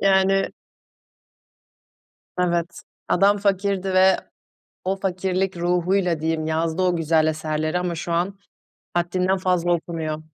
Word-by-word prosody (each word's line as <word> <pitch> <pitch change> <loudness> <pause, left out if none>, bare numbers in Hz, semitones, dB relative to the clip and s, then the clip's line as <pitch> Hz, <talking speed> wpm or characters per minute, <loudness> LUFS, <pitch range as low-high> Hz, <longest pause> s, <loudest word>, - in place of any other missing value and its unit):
Yani 195 0 +3 1.9
Evet, 170 -1 0 0.3
adam 200 +3 +4
fakirdi 195 -1 0
ve 190 0 +5 0.7
o 190 +1 0
fakirlik 190 0 -1
ruhuyla 175 -1 +1
diyeyim 160 -1 -1
yazdı 160 +2 0
o 180 -1 +2
güzel 160 -1 +2
eserleri 155 +1 -1
ama 180 -1 -2
şu 170 +1 -4
an 185 +4 -1 0.6
haddinden 180 +2 +1
fazla 180 -2 +1
okunuyor. 160 -2 -2
180 Hz, 110 wpm, -23 LUFS, 165-190 Hz, 1.9 s, ve